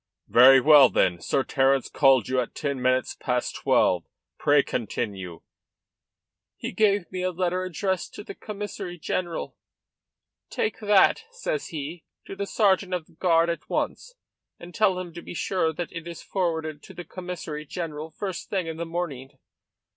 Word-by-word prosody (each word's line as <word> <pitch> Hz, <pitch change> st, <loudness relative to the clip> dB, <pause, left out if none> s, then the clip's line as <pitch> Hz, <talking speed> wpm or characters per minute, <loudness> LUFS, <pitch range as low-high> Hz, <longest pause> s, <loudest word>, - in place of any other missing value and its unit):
"Very 130 Hz, +3 st, +8 dB
well, 145 Hz, -1 st, +8 dB
then. 90 Hz, -1 st, +2 dB
Sir 135 Hz, +10 st, 0 dB
Terence 135 Hz, -1 st, +2 dB
called 135 Hz, -6 st, +4 dB
you 130 Hz, 0 st, +1 dB
at 120 Hz, -, -7 dB
ten 140 Hz, -3 st, -3 dB
minutes 130 Hz, +1 st, +1 dB
past 125 Hz, -2 st, -2 dB
twelve. 90 Hz, -2 st, +2 dB, 0.4 s
Pray 145 Hz, -1 st, +4 dB
continue." 100 Hz, -6 st, -4 dB, 1.2 s
"He -, -, -5 dB
gave 200 Hz, -2 st, +2 dB
me 185 Hz, -1 st, -3 dB
a 185 Hz, -, +1 dB
letter 180 Hz, +1 st, -1 dB
addressed 185 Hz, +1 st, -2 dB
to -, -, -7 dB
the -, -, -8 dB
Commissary 205 Hz, -3 st, -6 dB
general. 175 Hz, +1 st, -3 dB, 0.9 s
'Take 450 Hz, -2 st, -2 dB
that,' 210 Hz, -, +4 dB
says 485 Hz, -1 st, -3 dB
he, 155 Hz, +2 st, -6 dB, 0.2 s
'to -, -, -8 dB
the 200 Hz, 0 st, -4 dB
sergeant 195 Hz, -3 st, +2 dB
of 170 Hz, -3 st, -4 dB
the -, -, -24 dB
guard 165 Hz, 0 st, +3 dB
at 170 Hz, -, -7 dB
once, -, -, -3 dB, 0.4 s
and 175 Hz, +1 st, -11 dB
tell 190 Hz, -2 st, +2 dB
him 180 Hz, -2 st, -6 dB
to 170 Hz, -, -8 dB
be -, -, -9 dB
sure 170 Hz, -2 st, 0 dB
that 170 Hz, +2 st, -5 dB
it 165 Hz, 0 st, -7 dB
is 170 Hz, -1 st, -8 dB
forwarded 160 Hz, -5 st, -2 dB
to 190 Hz, -, -13 dB
the 175 Hz, 0 st, -7 dB
Commissary 175 Hz, -4 st, -6 dB
General 160 Hz, -2 st, -5 dB
first 190 Hz, +1 st, -5 dB
thing 190 Hz, -4 st, -1 dB
in 160 Hz, -1 st, -5 dB
the 170 Hz, 0 st, -4 dB
morning. 145 Hz, -6 st, -5 dB
170 Hz, 165 wpm, -26 LUFS, 140-185 Hz, 1.2 s, Very